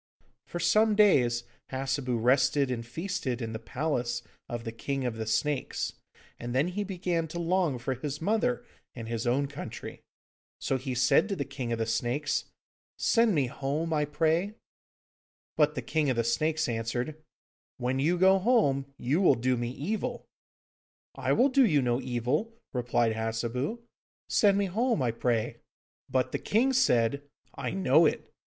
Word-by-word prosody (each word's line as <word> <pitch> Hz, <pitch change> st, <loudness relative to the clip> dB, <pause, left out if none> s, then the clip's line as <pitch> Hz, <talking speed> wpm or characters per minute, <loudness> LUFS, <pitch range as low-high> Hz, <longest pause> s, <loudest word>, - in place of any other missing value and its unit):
For 175 Hz, -, -5 dB
some 210 Hz, +6 st, +3 dB
days 125 Hz, -, +4 dB, 0.3 s
Hassebu 130 Hz, -1 st, -1 dB
rested 135 Hz, +3 st, +3 dB
and 115 Hz, -2 st, -3 dB
feasted 150 Hz, -1 st, -3 dB
in 115 Hz, -2 st, -4 dB
the 110 Hz, -, -4 dB
palace 120 Hz, -2 st, -2 dB, 0.3 s
of 120 Hz, -1 st, -4 dB
the 115 Hz, -, -4 dB
King 135 Hz, +3 st, -3 dB
of 120 Hz, -2 st, -2 dB
the 110 Hz, -1 st, -4 dB
Snakes, 140 Hz, +5 st, -1 dB, 0.5 s
and 120 Hz, +1 st, -5 dB
then 145 Hz, +7 st, +2 dB
he 205 Hz, +3 st, -2 dB
began 180 Hz, -4 st, -2 dB
to 160 Hz, -, -7 dB
long 170 Hz, -4 st, +1 dB
for 120 Hz, +2 st, -2 dB
his 140 Hz, +3 st, -5 dB
mother 225 Hz, +7 st, 0 dB, 0.3 s
and 115 Hz, -2 st, -7 dB
his 115 Hz, +1 st, -3 dB
own 135 Hz, +4 st, +2 dB
country. 140 Hz, +1 st, -8 dB, 0.6 s
So 135 Hz, -, -1 dB
he 130 Hz, 0 st, -4 dB
said 125 Hz, -, +4 dB
to 200 Hz, -, -1 dB
the -, -, -3 dB
King 125 Hz, -4 st, -5 dB
of 115 Hz, -, 0 dB
the 115 Hz, -, -1 dB
Snakes, 120 Hz, +6 st, -1 dB, 0.5 s
'Send 230 Hz, -4 st, +3 dB
me 140 Hz, -3 st, +2 dB
home, 140 Hz, +6 st, -2 dB
I 150 Hz, -1 st, +2 dB
pray.' 160 Hz, +7 st, 0 dB, 1.0 s
But 150 Hz, 0 st, +3 dB
the -, -, -3 dB
King 155 Hz, -3 st, 0 dB
of 130 Hz, -, +1 dB
the 115 Hz, -, +1 dB
Snakes 155 Hz, +7 st, +1 dB
answered, 120 Hz, +6 st, -3 dB, 0.6 s
'When 130 Hz, +1 st, -1 dB
you 165 Hz, +6 st, +2 dB
go 190 Hz, +2 st, +5 dB
home, 145 Hz, -, +2 dB
you 145 Hz, +9 st, 0 dB
will 170 Hz, -8 st, +5 dB
do 125 Hz, +1 st, +1 dB
me 120 Hz, 0 st, -2 dB
evil!' 220 Hz, -, -3 dB, 0.9 s
'I -, -, 0 dB
will 265 Hz, +3 st, +4 dB
do 270 Hz, 0 st, +5 dB
you 160 Hz, -, +4 dB
no 125 Hz, -1 st, +1 dB
evil,' 130 Hz, -, -1 dB, 0.2 s
replied 120 Hz, -2 st, +1 dB
Hassebu; 115 Hz, -, -2 dB, 0.5 s
'send 200 Hz, -2 st, +4 dB
me 200 Hz, -, +2 dB
home, 220 Hz, -, 0 dB
I 120 Hz, -, +1 dB
pray.' 115 Hz, -1 st, -1 dB, 0.5 s
But 130 Hz, -1 st, 0 dB
the -, -, -2 dB
king 250 Hz, +6 st, +2 dB
said, 140 Hz, -, +3 dB, 0.3 s
'I 135 Hz, -3 st, -4 dB
know 160 Hz, -3 st, +5 dB
it. -, -, -4 dB
140 Hz, 165 wpm, -29 LUFS, 120-175 Hz, 1.0 s, go